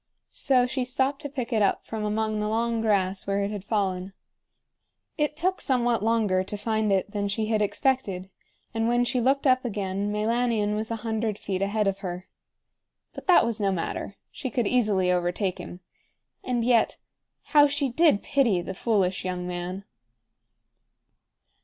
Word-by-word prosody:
So 255 -2 +3
she 255 +1 -2
stopped 265 +3 -1
to 285 - -5
pick 255 -3 -4
it 220 - +2
up 200 - +1
from 220 -1 -4
among 215 0 -1
the 210 0 -1
long 230 +1 0
grass, 195 -3 +1
where 200 0 0
it 200 - -2
had 205 -3 -5
fallen. 195 -3 -1 1.0
It 300 -1 -1
took 370 +4 0
somewhat 240 -4 +1
longer 215 -4 +2
to 205 +2 -6
find 215 0 0
it 195 +1 +1
than 205 -1 -1
she 215 +2 -1
had 215 -1 +1
expected, 200 -5 0 0.4
and 225 0 0
when 240 +1 +2
she 250 0 0
looked 270 +4 +2
up 255 -1 +4
again 200 -3 -2
Meilanion 220 0 +1
was 215 +1 -3
a 230 - -1
hundred 220 -2 -1
feet 190 -2 -3
ahead 205 +1 +1
of 195 0 -1
her. 180 -1 -6 0.9
But - - -10
that 360 - +6
was 230 -1 -1
no 200 -2 +1
matter. 190 +2 -3 0.2
She 265 - -5
could 240 -1 0
easily 200 -6 +2
overtake 180 +2 -1
him. 180 - -9 0.6
And 240 -2 -1
yet, 235 -2 +3 0.6
how 290 -1 +8
she 285 0 0
did 300 -4 +3
pity 235 -10 +2
the 190 - -5
foolish 190 -3 0
young 180 -1 -3
man! 180 +2 -4
215 Hz, 170 wpm, -26 LUFS, 195-245 Hz, 1.0 s, how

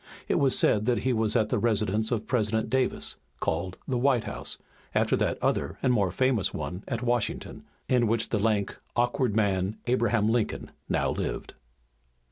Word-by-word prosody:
It - - +2
was 135 -2 +3
said 110 +1 +3
that 125 -1 +1
he 130 - +2
was 110 -2 +1
at 110 - +2
the 125 - +1
residence 110 -1 +1
of 110 -2 -1
President 110 -3 0
Davis, 130 -1 0 0.2
called 90 +3 -2
the 125 -2 0
White 130 -2 +3
House, - - -3 0.4
after - - +3
that - - 0
other - - 0
and 125 - +4
more 100 -5 +2
famous 130 -2 +1
one 90 +4 -5
at 120 -1 -3
Washington, 120 -2 -1 0.2
in 120 -2 +3
which 115 +1 0
the 110 - 0
lank, 105 -2 +1 0.2
awkward 120 -2 +1
man, 100 -2 +1
Abraham 120 -3 +2
Lincoln, 115 -1 -1 0.2
now - - +1
lived. - - -4
115 Hz, 170 wpm, -27 LUFS, 105-125 Hz, 0.4 s, and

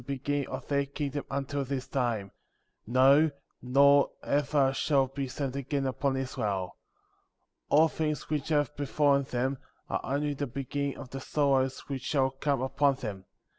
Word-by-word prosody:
beginning 140 0 -2
of 130 -1 -6
their 140 -1 +1
kingdom 145 0 -3
until 140 +1 -2
this 135 -1 -3
time; 115 -7 -1 0.6
no, 135 +6 +5 0.3
nor 140 +2 +5
ever 140 -1 +2
shall 135 -1 +2
be 135 +1 -4
sent 135 0 -4
again 140 0 -2
upon 135 +1 0
Israel. 100 -8 -2 0.9
19. 145 - +5
All 165 - +6
things 155 -1 -2
which 150 -1 -2
have 145 -1 +1
befallen 145 0 +2
them, 130 +2 -1 0.3
are - - 0
only 145 +2 -1
the 145 0 -3
beginning 140 +2 -3
of 130 -3 -9
the 135 - -5
sorrows 135 -2 +1
which 135 -2 -5
shall 135 -1 +1
come 135 -1 -1
upon 140 +1 +2
them. 100 -7 -6
140 Hz, 155 wpm, -29 LUFS, 130-145 Hz, 0.9 s, All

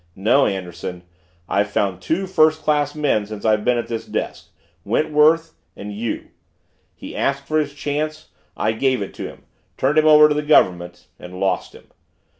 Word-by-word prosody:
No, 115 +8 +3
Anderson, 90 -2 -5 0.4
I've 100 +1 0
found 95 -3 -1
two 180 - -1
first 155 -3 +2
class 145 -1 +1
men 140 -9 0
since 105 0 -8
I've 105 -1 +2
been 125 +1 +2
at 120 - -3
this 115 -1 -5
desk - - -4 0.3
Wentworth 155 +7 +2 0.2
and 105 +1 -7
you. 110 +2 -4 0.7
He - - -10
asked 140 0 -1
for 155 +2 +1
his 145 -2 -3
chance; 150 +2 -4 0.3
I 110 - +1
gave 130 0 0
it 95 - -9
to - - -6
him - - -13 0.3
turned 145 +4 +2
him 155 - +3
over 150 0 +8
to 150 - +1
the 150 - -1
Government 90 - +2
and 90 +1 -10
lost 95 -1 -1
him. - - -16
130 Hz, 175 wpm, -21 LUFS, 100-150 Hz, 0.7 s, over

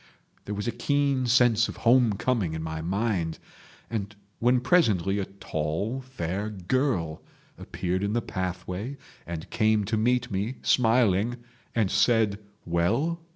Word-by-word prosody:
There 105 - -4
was 105 +3 -3
a - - +1
keen 140 +1 +1
sense 120 -1 +4
of - - -7
home 120 -2 +5
coming 100 -6 0
in 80 - -4
my 80 0 -4
mind, 95 -2 -1 0.5
and 105 -2 -4 0.2
when 125 +2 +3
presently 105 - +2
a 95 - -1
tall, 95 +6 -3
fair 105 -6 -4
girl 95 - -1 0.3
appeared 90 +1 -3
in 100 +1 0
the 120 - +1
pathway 90 +7 -4 0.3
and 85 -1 -5
came 110 -2 +2
to 110 +2 -1
meet 120 +2 +1
me, 100 +6 -2
smiling, 115 -2 +3 0.4
and 110 -5 +2
said 110 -4 +3 0.3
Well? 115 - 0
105 Hz, 140 wpm, -27 LUFS, 95-120 Hz, 0.5 s, home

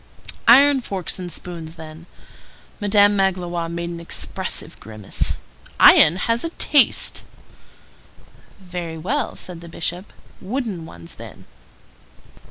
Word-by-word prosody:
"Iron 275 +3 +7
forks 190 -6 -3
and 180 -1 -6
spoons, 165 -1 -8
then." 160 +1 -12 0.7
Madame 205 -1 +4
Magloire 175 -3 -1
made 170 0 -4
an 170 - -7
expressive 170 - -5
grimace. 110 -2 -3 0.5
"Iron 155 - +7
has 230 +5 0
a 330 - -2
taste." 295 -4 +3 1.4
"Very 175 -3 -7
well," 235 - -2
said 175 -2 -9
the 170 - -11
Bishop; 175 +3 -4 0.3
"wooden 205 -6 -4
ones 85 -1 -12
then." - - -12
180 Hz, 110 wpm, -21 LUFS, 165-205 Hz, 1.4 s, Iron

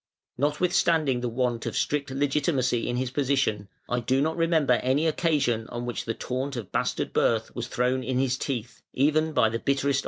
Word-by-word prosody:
Notwithstanding 150 -2 +1
the 120 - -1
want 120 -1 -1
of - - -3
strict 145 -1 0
legitimacy 135 -3 0
in 120 - -1
his 130 0 -2
position, 130 -7 0 0.2
I 125 - 0
do 130 +3 +1
not 160 +3 +1
remember 165 -5 +2
any 135 +5 +1
occasion 150 -9 +1
on 120 0 -5
which 120 - -4
the 115 - -2
taunt 130 +2 -3
of 115 -5 -6
bastard - - -1
birth 110 -1 +1
was 120 0 -4
thrown 125 +1 0
in 130 -1 -1
his 130 -1 +1
teeth, 125 -4 -4
even 155 +3 +2
by 115 -7 +3
the 115 +1 -3
bitterest 140 +1 0
of - - 0
his 140 - +2
foes. - - +2
130 Hz, 200 wpm, -26 LUFS, 120-145 Hz, 0.2 s, by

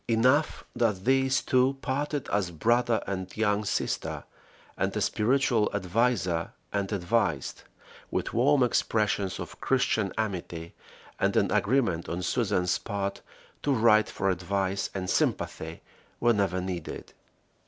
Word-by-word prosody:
Enough 130 +7 +2
that 110 -6 0
these 135 0 +3
two 130 +1 +2
parted 145 +1 -2
as 100 -4 0
brother 115 +7 +1
and 95 -1 -5
young 105 -1 +1
sister, 100 - -2 0.5
and - - -1
a - - +1
spiritual 120 -1 +2
adviser 95 -3 0 0.2
and 100 -1 -1
advised, 90 - 0 0.5
with - - -2
warm 135 +3 +4
expressions 105 -5 0
of - - -8
Christian 110 -6 +1
amity, 90 -6 -4 0.5
and - - +1
an - - +2
agreement 105 -8 +1
on 90 +2 -3
Susan's 95 -7 +1
part 100 -1 -3 0.4
to 145 - 0
write 110 -4 +4
for 95 - 0
advice 95 +2 -1
and 95 -1 -3
sympathy - - -1 0.4
whenever 100 -6 +2
needed. 90 -3 -5
105 Hz, 120 wpm, -28 LUFS, 95-125 Hz, 0.5 s, warm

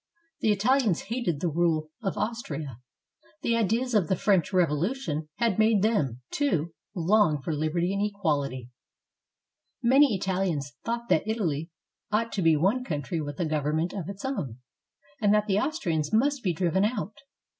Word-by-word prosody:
The 220 - +2
Italians 215 -2 +2
hated 195 - -1
the 180 - +1
rule 160 -1 0
of 195 -4 -2
Aus 230 +1 -1
tria. 140 - -6 0.6
The 230 - +2
ideas 230 +3 +1
of 200 -7 +3
the 190 - +2
French 190 -2 +2
Revolution 165 - 0
had 230 -4 0
made 220 -2 +4
them, 145 - +1
too, 170 - 0 0.2
long 180 -3 +3
for 160 - -2
liberty 165 +5 0
and 200 +1 0
equality. 145 - -1 1.1
Many 265 0 +5
Italians 180 -7 -1
said 235 +1 -1
that 160 - +2
Italy 170 -8 -1 0.4
ought 230 +2 +1
to 200 - -2
be 165 -2 +5
one 195 +12 +2
country 155 - -3
with 145 -1 -6
a 175 - +1
govern 150 -1 0
ment 165 +3 -1
of 185 -4 -5
its 200 +3 -7
own, 145 - -3 0.6
and 205 -2 +4
that 210 0 +2
the 200 -1 +2
Austrians 170 - -1
must 275 +5 +2
be 185 - +1
driven 180 +3 +1
out. 215 -1 -2
190 Hz, 165 wpm, -27 LUFS, 155-220 Hz, 1.1 s, Many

